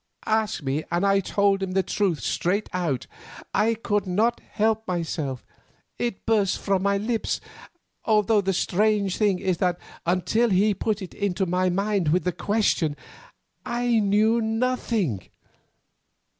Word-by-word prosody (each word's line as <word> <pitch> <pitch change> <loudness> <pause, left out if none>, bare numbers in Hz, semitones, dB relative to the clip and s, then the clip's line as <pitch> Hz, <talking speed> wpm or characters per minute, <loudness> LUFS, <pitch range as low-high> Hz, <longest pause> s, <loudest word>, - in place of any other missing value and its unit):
—asked 220 -6 0
me 140 +3 -1
and 175 +3 0
I 195 0 +4
told 200 0 +1
him 190 -1 -2
the 190 0 +2
truth 185 - 0
straight 190 - 0
out. 165 -9 -1 0.5
I 220 +3 +2
could 205 -3 -1
not 215 +6 +1
help 220 +1 -1
myself; 160 -7 -3 0.5
it 235 -5 -3
burst 210 -4 +2
from 195 -2 0
my 200 +1 +2
lips, 225 +2 -1 0.6
although 215 -1 +3
the 195 0 0
strange 200 +1 +1
thing 205 -4 +2
is 185 -1 -1
that 180 -2 +1 0.3
until 185 +7 +2
he 205 +2 +3
put 210 +1 -2
it 185 - -9
into 195 -1 -1
my 185 +1 +1
mind 195 -1 0
with 165 +3 +2
the 180 - 0
question, 180 -5 0 0.7
I 240 -1 +1
knew 215 +3 +3
nothing. 225 - -1
200 Hz, 145 wpm, -25 LUFS, 180-220 Hz, 0.7 s, I